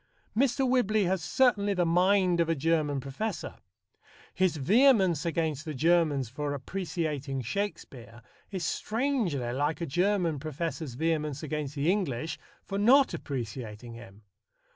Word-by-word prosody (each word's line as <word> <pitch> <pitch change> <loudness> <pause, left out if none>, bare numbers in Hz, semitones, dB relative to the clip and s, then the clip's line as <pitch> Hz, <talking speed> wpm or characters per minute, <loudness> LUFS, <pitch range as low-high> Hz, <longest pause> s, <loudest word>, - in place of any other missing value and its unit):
Mr. 265 +2 +2
Whibley 220 -5 +2
has 185 -1 0
certainly 205 -3 +2
the 180 -1 +2
mind 180 +1 +3
of 165 -1 +2
a 165 - +2
German 150 -1 +1
professor. 140 - -5 0.8
His 185 -4 +1
vehemence 190 - +4
against 160 -3 -1
the 155 -2 -5
Germans 155 -3 +2
for 145 +4 -3
appreciating 150 -3 -3
Shakespeare 120 - -5 0.3
is 185 -4 -4
strangely 215 - -1
like 145 +5 -1
a 170 - -2
German 175 0 +1
professor's 155 -2 -4
vehemence 150 -1 -1
against 150 -1 -4
the 150 +4 +2
English 160 - -2 0.2
for 195 0 -4
not 260 +6 +5
appreciating 120 -3 -6
him. 110 -3 -13
165 Hz, 130 wpm, -29 LUFS, 140-195 Hz, 0.8 s, not